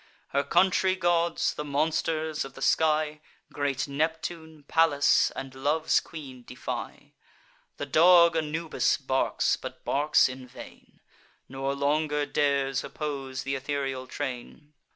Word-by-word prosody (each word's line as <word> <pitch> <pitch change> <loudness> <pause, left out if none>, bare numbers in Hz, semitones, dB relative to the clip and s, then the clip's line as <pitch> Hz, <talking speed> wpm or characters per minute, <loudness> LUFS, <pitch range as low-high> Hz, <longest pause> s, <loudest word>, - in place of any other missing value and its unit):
Her 140 +1 +1
country 185 +2 +3
gods, 170 -2 +1
the 150 - -5
monsters 155 +1 -1
of 135 -1 -10
the 135 - -11
sky, 155 +1 +2 0.3
Great 140 -1 -1
Neptune, 160 +1 -3
Pallas, 160 -3 +3
and 135 -1 -6
Love's 150 +4 +1
Queen 135 -6 -10
defy: - - -7 0.6
The - - -4
dog 170 +3 +6
Anubis 160 +1 0
barks, 135 -1 0
but - - -9
barks 145 +2 +3
in 130 0 -8
vain, - - -14 0.5
Nor 135 +1 -3
longer 150 +1 0
dares 140 -2 0
oppose 135 -3 -5
th' - - -7
ethereal 135 -1 -3
train. 140 +2 -6
145 Hz, 120 wpm, -27 LUFS, 135-160 Hz, 0.6 s, dog